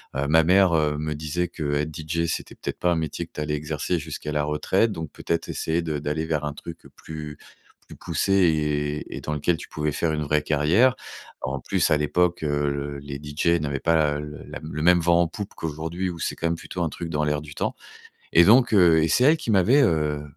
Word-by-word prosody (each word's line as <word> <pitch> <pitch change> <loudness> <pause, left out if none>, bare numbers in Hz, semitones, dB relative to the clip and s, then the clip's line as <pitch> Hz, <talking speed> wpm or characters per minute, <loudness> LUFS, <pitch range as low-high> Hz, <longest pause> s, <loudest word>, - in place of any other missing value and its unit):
Heu, 70 +1 -1
ma 80 +1 +5
mère, 95 0 +4
heu, 75 -2 +1
me 75 -1 -3
disait 80 +4 -2
qu'être 75 -2 -2
DJ, 80 +2 -2
c'était, - - -4
peut-être - - -5
pas, 90 - +1
un - - +2
métier 80 +1 -3
que 80 - -29
tu 75 - -5
allais 75 0 -1
exercer 75 +3 -2
jusqu'à 75 -1 -5
la 75 -1 0
retraite, 95 +9 +1
donc 80 -5 -6
peut-être 85 0 -3
essayer 80 +2 -1
de 80 -3 -3
d'aller 75 +2 -2
vers 75 -2 -1
un 75 - -3
truc, 85 +2 -10
heu, - - -13
plus 75 -2 -8 0.5
plus - - -11
poussé 95 - -1
et 75 -5 +1
et - - -7
dans 75 - -3
lequel 80 +3 0
tu - - -9
pouvais 75 0 -2
faire 80 +2 -1
une 75 - -2
vraie 75 +1 +1
carrière. 85 - +3 0.5
En 70 +2 -3
plus, 90 +3 0
à 75 - +5
l'époque, 85 +3 +1
heu, 70 -1 -1
les 70 -1 -7
DJ 80 +3 0
n'avaient 70 -2 -2
pas, 80 -3 +2
heu, - - -4
le 75 -1 -8
la - - -7
le 75 0 -5
même 90 0 +6
vent 85 +1 +3
en 85 - +2
poupe 100 +4 -7
qu'aujourd'hui 80 +4 -3
ou 85 - -6
c'est - - -2
quand 85 - -2
même 85 - 0
plutôt 90 +1 -5
un 80 - 0
truc 85 +1 -6
dans 75 -1 -1
l'air 75 0 0
du 75 -1 -10
temps - - -2 0.6
et 85 - +7
donc 120 +5 +5
heu, 85 -6 +5
et 80 - +2
c'est 125 - +3
elle 155 +3 +6
qui 120 - -4
m'avait, 110 +8 +4
heu, 75 - +1
80 Hz, 235 wpm, -24 LUFS, 75-85 Hz, 0.6 s, et